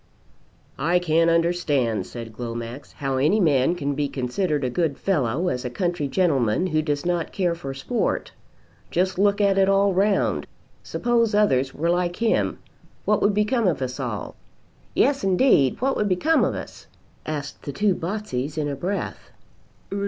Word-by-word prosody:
"I 170 Hz, +4 st, +2 dB
can't 165 Hz, -1 st, +2 dB
understand," 150 Hz, -, +1 dB
said 115 Hz, -2 st, -8 dB
Glomax, 120 Hz, +3 st, -6 dB
"how 135 Hz, -2 st, -2 dB
any 155 Hz, +11 st, +3 dB
man 150 Hz, -2 st, +3 dB
can 145 Hz, -4 st, -2 dB
be 145 Hz, +1 st, -1 dB
considered 145 Hz, +4 st, -1 dB
a 125 Hz, -, 0 dB
good 155 Hz, 0 st, 0 dB
fellow 155 Hz, -2 st, 0 dB
as 125 Hz, -6 st, -1 dB
a 125 Hz, -, -3 dB
country 175 Hz, +1 st, -1 dB
gentleman 140 Hz, -, +1 dB
who 155 Hz, -4 st, +1 dB
does 145 Hz, -1 st, -2 dB
not 175 Hz, -2 st, -1 dB
care 180 Hz, -3 st, 0 dB
for 135 Hz, -5 st, -6 dB
sport. 185 Hz, -, -2 dB, 0.6 s
Just 185 Hz, +1 st, 0 dB
look 200 Hz, 0 st, +3 dB
at 200 Hz, -1 st, +3 dB
it 195 Hz, 0 st, +4 dB
all 195 Hz, 0 st, +3 dB
round. 195 Hz, +2 st, +1 dB, 0.3 s
Suppose 230 Hz, -3 st, +1 dB
others 135 Hz, -11 st, +2 dB
were 170 Hz, +3 st, +1 dB
like 175 Hz, 0 st, 0 dB
him 230 Hz, +2 st, +1 dB, 0.5 s
what 210 Hz, -, +2 dB
would 205 Hz, 0 st, +3 dB
become 210 Hz, +1 st, +2 dB
of 175 Hz, -, +1 dB
us 130 Hz, 0 st, -4 dB
all?" 120 Hz, -6 st, -4 dB, 0.6 s
"Yes 275 Hz, -2 st, +2 dB
indeed, 185 Hz, -, +3 dB
what 270 Hz, +1 st, +1 dB
would 210 Hz, -, 0 dB
become 300 Hz, -, +3 dB
of -, -, 0 dB
us?" -, -, -9 dB, 0.4 s
asked 150 Hz, -2 st, -5 dB
the 145 Hz, -, -5 dB
two 200 Hz, +6 st, +2 dB
Botseys 165 Hz, -7 st, -4 dB
in 150 Hz, -1 st, 0 dB
a 140 Hz, -, -2 dB
breath. 185 Hz, +8 st, -4 dB
170 Hz, 165 wpm, -24 LUFS, 135-195 Hz, 0.6 s, it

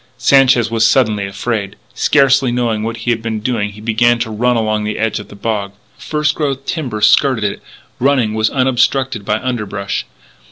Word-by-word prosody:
Sanchez 130 Hz, -4 st, +4 dB
was 115 Hz, -1 st, +1 dB
suddenly 110 Hz, -5 st, +2 dB
afraid. 100 Hz, 0 st, -3 dB, 0.2 s
Scarcely 135 Hz, -2 st, +3 dB
knowing 120 Hz, -3 st, -1 dB
what 115 Hz, +1 st, -3 dB
he 120 Hz, -, +2 dB
was 110 Hz, -1 st, -4 dB
doing 115 Hz, -4 st, -1 dB
he 105 Hz, -, -12 dB
began 120 Hz, +2 st, +2 dB
to 120 Hz, -1 st, -3 dB
run 120 Hz, +3 st, +1 dB
along 110 Hz, -2 st, 0 dB
the 105 Hz, 0 st, -3 dB
edge 110 Hz, -1 st, -1 dB
of 105 Hz, -, -10 dB
the -, -, -13 dB
bog. 100 Hz, -2 st, -3 dB, 0.2 s
First 150 Hz, -1 st, -1 dB
growth 140 Hz, -3 st, -3 dB
timber 125 Hz, -10 st, -3 dB
skirted 130 Hz, 0 st, +3 dB
it; 100 Hz, -, -2 dB, 0.4 s
running 130 Hz, -5 st, +2 dB
was 110 Hz, 0 st, +1 dB
unobstructed 130 Hz, -2 st, 0 dB
by 105 Hz, +2 st, 0 dB
underbrush. 105 Hz, -6 st, -3 dB
115 Hz, 170 wpm, -16 LUFS, 105-130 Hz, 0.4 s, Sanchez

